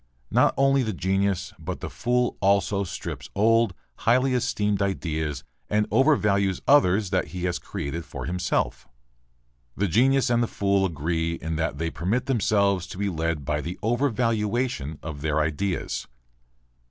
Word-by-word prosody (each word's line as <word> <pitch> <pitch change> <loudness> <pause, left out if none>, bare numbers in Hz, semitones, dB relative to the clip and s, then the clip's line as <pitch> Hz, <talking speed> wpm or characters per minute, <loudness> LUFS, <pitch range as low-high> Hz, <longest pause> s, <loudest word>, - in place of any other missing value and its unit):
Not - - +4
only 135 0 +4
the 110 -4 -1
genius, 95 0 0
but 85 +3 -5
the - - -5
fool 120 - 0
also 100 0 +2
strips 85 -3 -6
old, 115 -1 +3 0.2
highly 130 +4 +2
esteemed 105 -5 0
ideas 80 -6 -2 0.3
and 105 0 +1
overvalues 100 -9 +3
others 105 -8 +4
that 95 - +1
he 90 -1 -6
has 90 -1 -1
created 80 +4 -5
for 65 -6 -7
himself. 80 -7 -1 0.9
The 100 - +1
genius 130 +7 +3
and 120 0 +3
the 120 - +1
fool 100 -2 +1
agree 80 +1 -2
in 80 -1 -4
that 80 -3 -1
they 80 +2 -2
permit 100 +9 -1
themselves 100 -7 +1
to 90 - -9
be 100 0 0
led 80 -4 -2
by 75 +2 -1
the 85 +4 -5
"overvaluation" 115 - 0
of 75 -3 -6
their 80 0 0
ideas. 80 +5 -2
95 Hz, 150 wpm, -25 LUFS, 80-115 Hz, 0.9 s, Not